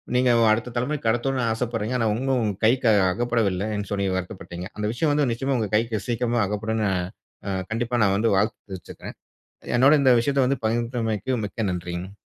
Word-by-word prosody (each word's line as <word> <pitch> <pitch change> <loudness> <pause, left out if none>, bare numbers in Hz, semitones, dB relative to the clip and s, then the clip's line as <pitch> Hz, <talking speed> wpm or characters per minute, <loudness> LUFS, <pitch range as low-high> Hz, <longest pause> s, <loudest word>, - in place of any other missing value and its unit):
நீங்க 125 0 +3 0.2
அடுத்த 115 +3 0
தலைமுறைக்கு 125 0 -2
கடத்தணும்னு 120 +1 0
ஆசைப்படுறீங்க. 115 0 -2
ஆனா 115 - +1
இன்னும் 125 -3 0
கைக்கு 120 +2 +3
அ - - +4 0.2
அகப்படவில்லைன்னு 105 -3 -1
சொல்லி 100 -1 0
வருத்தப்பட்டீங்க. 90 -1 -6
அந்த 105 0 -3
விஷயம் 150 +5 +1
வந்து 145 -3 +2
நிச்சயமா 135 +2 -1
உங்க 105 -3 -2
கைக்கு 110 -2 0
சீக்கிரமா 120 0 0
அகப்படும்ன்னு 110 +1 -1
அ - - 0 0.5
அ 95 -1 -1
கண்டிப்பா 120 +2 -1
நான் 100 -1 +3
வந்து 115 +2 +2
வாழ்த்து 110 +3 0
தெரிவிச்சுக்கிறேன். 95 -2 -9 0.6
என்னோட 130 +4 +5
இந்த 130 -2 +5
விஷயத்த 135 +1 +1
வந்து 135 0 0
பகிர்ந்தமைக்கு 115 0 -1
மிக்க 105 -1 -3
நன்றிங்க. 90 +2 -5
115 Hz, 165 wpm, -24 LUFS, 105-125 Hz, 0.6 s, என்னோட